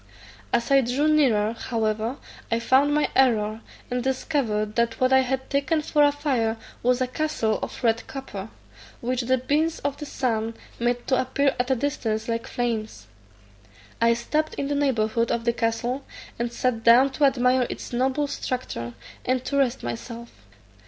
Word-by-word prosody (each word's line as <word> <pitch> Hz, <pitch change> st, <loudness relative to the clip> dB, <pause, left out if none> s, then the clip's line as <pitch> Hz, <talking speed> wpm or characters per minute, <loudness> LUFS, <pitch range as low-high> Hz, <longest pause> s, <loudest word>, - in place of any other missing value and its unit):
As 235 Hz, -, 0 dB
I 275 Hz, 0 st, +7 dB
drew 260 Hz, +5 st, +1 dB
nearer, 235 Hz, -9 st, +3 dB
however, 225 Hz, +1 st, -2 dB, 0.3 s
I 230 Hz, -, +3 dB
found 265 Hz, +5 st, +3 dB
my 300 Hz, 0 st, +2 dB
error, 220 Hz, -4 st, +3 dB, 0.3 s
and 250 Hz, 0 st, -1 dB
discovered 235 Hz, -6 st, -1 dB
that 235 Hz, -1 st, +1 dB
what 255 Hz, +1 st, +3 dB
I 265 Hz, -, +7 dB
had 265 Hz, 0 st, -1 dB
taken 285 Hz, +3 st, 0 dB
for 295 Hz, -, +2 dB
a 290 Hz, 0 st, +6 dB
fire 260 Hz, -6 st, 0 dB, 0.2 s
was 250 Hz, +1 st, +2 dB
a 255 Hz, -, +2 dB
castle 255 Hz, -6 st, -1 dB
of -, -, -6 dB
red 230 Hz, -1 st, +1 dB
copper, 225 Hz, -7 st, -7 dB, 0.5 s
which 250 Hz, +1 st, -1 dB
the 255 Hz, +2 st, +2 dB
beams 300 Hz, +6 st, 0 dB
of 285 Hz, 0 st, -2 dB
the 295 Hz, -, -7 dB
sun 230 Hz, -4 st, -1 dB, 0.2 s
made 240 Hz, +1 st, 0 dB
to 260 Hz, -, +2 dB
appear 275 Hz, +2 st, +1 dB
at 250 Hz, +1 st, 0 dB
a 265 Hz, -, +3 dB
distance 225 Hz, -4 st, -2 dB
like 230 Hz, 0 st, -2 dB
flames. 230 Hz, -3 st, -3 dB, 1.0 s
I 230 Hz, 0 st, +5 dB
stopped 305 Hz, +6 st, -1 dB
in 280 Hz, -, -3 dB
the -, -, 0 dB
neighbourhood 235 Hz, -5 st, +1 dB
of 235 Hz, 0 st, -1 dB
the 235 Hz, -, +2 dB
castle, 235 Hz, +3 st, -1 dB, 0.4 s
and 235 Hz, 0 st, -1 dB
sat 235 Hz, -1 st, -1 dB
down 250 Hz, +4 st, +6 dB
to 285 Hz, +2 st, +2 dB
admire 255 Hz, -2 st, +3 dB
its -, -, -7 dB
noble 265 Hz, +4 st, +1 dB
structure, 245 Hz, -, -4 dB, 0.3 s
and 255 Hz, 0 st, 0 dB
to 280 Hz, -, -2 dB
rest 265 Hz, -4 st, +1 dB
myself. 230 Hz, -, -6 dB
250 Hz, 170 wpm, -25 LUFS, 230-275 Hz, 1.0 s, I